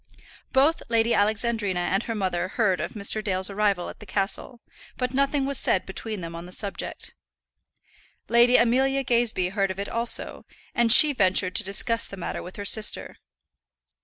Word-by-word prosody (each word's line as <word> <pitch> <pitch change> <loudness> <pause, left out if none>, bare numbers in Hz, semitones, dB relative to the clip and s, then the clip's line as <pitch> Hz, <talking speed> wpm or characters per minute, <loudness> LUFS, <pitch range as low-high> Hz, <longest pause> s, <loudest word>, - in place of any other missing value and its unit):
Both 290 +5 +3
Lady 230 0 +2
Alexandrina 205 -2 0
and 195 +2 0
her 230 - -5
mother 185 -3 -1
heard 190 -3 0
of - - -5
Mr. 215 +1 -1
Dale's 190 -1 -1
arrival 200 -3 0
at - - -10
the 210 - -13
castle, 205 +5 -3 0.4
but 250 0 -2
nothing 275 +1 +1
was 275 -2 0
said 185 - +1
between 210 +1 -6
them 165 0 -7
on 170 +1 -8
the - - -12
subject. 200 +1 -4 1.1
Lady 240 +1 +5
Amelia 265 +3 +2
Gazebee 235 -7 +1
heard 195 0 -1
of 190 - -5
it 200 0 -4
also, 235 +1 -1 0.3
and 235 -1 +3
she 295 +4 +8
ventured 185 -4 +1
to - - 0
discuss 230 +4 0
the 195 - -9
matter 180 - -5
with 180 - -10
her 205 - -6
sister. 215 +1 +1
215 Hz, 170 wpm, -25 LUFS, 190-240 Hz, 1.1 s, she